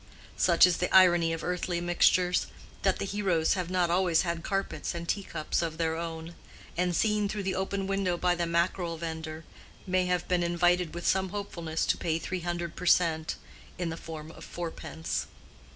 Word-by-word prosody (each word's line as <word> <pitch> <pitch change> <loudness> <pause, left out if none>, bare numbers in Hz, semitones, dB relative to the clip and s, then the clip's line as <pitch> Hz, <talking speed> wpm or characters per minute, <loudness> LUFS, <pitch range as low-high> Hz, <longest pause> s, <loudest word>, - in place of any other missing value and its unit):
Such 170 -1 +6
is 180 -2 +2
the 180 - -1
irony 175 -3 +6
of 165 0 -3
earthly 180 -1 -1
mixtures, 180 +1 +3 0.3
that - - +2
the - - -3
heroes 190 -5 +1
have 180 -3 -2
not 180 -2 +1
always 175 -2 +3
had 170 -2 -2
carpets 195 -2 -2
and 170 0 -5
teacups 180 -7 -1
of 165 -2 -3
their 160 -1 0
own; 165 0 -5 0.4
and, 180 0 0
seen 210 0 +2
through 210 -1 -3
the 190 0 -1
open 195 +1 -2
window 195 -2 0
by 180 0 +2
the 175 -1 -1
mackerel 170 0 0
vender, 160 -1 -5 0.4
may 185 -1 +1
have 180 -1 0
been 180 -1 +2
invited 175 0 +2
with 175 - -5
some 190 0 +2
hopefulness 170 -5 -3
to - - +1
pay 160 -1 0
three 185 +2 -3
hundred 175 -1 -3
per 180 - -5
cent, 160 -3 +3 0.4
in 175 -2 -2
the 165 - -4
form 160 -1 -8
of - - -12
fourpence. 165 -1 -4
175 Hz, 185 wpm, -29 LUFS, 165-185 Hz, 0.4 s, Such